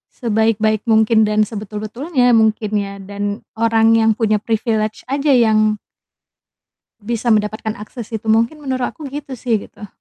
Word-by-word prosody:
sebaik-baik 220 -1 0
mungkin 220 0 +4
dan 215 0 +2
sebetul-betulnya 225 - -1
mungkin 220 -2 +2
ya 200 0 -5
dan 205 +2 -4 0.2
orang 225 0 +4
yang 225 0 +4
punya 215 -2 +1
privilege 220 -1 -1
aja 280 +1 +1
yang 215 -3 +3 1.2
bisa 230 +2 -2
mendapatkan 215 +1 0
akses 215 +2 -9
itu 225 -1 -6
mungkin 225 +6 +2
menurut 260 -4 -2
aku 310 - -11
gitu 285 -3 -6
sih 225 -3 0
gitu. 210 - -12
220 Hz, 140 wpm, -18 LUFS, 215-235 Hz, 1.2 s, mungkin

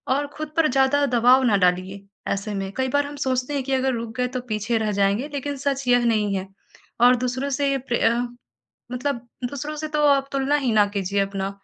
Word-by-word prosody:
और 285 +1 -1
खुद 310 0 -5
पर 325 -1 +4
ज़्यादा 270 +2 +3
दबाव 250 +1 +4
न 200 - +4
डालिए 185 +2 0 0.3
ऐसे 200 +2 -4
में 195 -1 -3
कई 260 0 +1
बार 285 +2 +1
हम 290 - -8
सोचते 260 0 -1
हैं 275 - -1
कि, 270 - -5
अगर 265 0 +1
रुक 230 -1 -5
गए 250 0 +1
तो 255 0 -4
पीछे 215 +2 0
रह 215 -1 -1
जाएँगे 200 +7 +1
लेकिन 285 0 -3
सच 275 -1 -2
यह 245 -1 +4
नहीं 210 -3 +1
है 190 0 -3 0.5
और 245 +1 +7
दूसरों 260 +3 -2
से 275 -1 +1
प्रय 235 -1 +3 0.8
मतलब 250 0 -2 0.3
दूसरों 290 +2 -5
से 310 +1 -4
तो 300 - +3
आप 275 -1 +3
तुलना 275 +1 +1
ही 235 - +2
ना 210 -1 +5
कीजिए 200 0 0
अपना 195 0 -2
250 Hz, 210 wpm, -23 LUFS, 210-275 Hz, 0.8 s, और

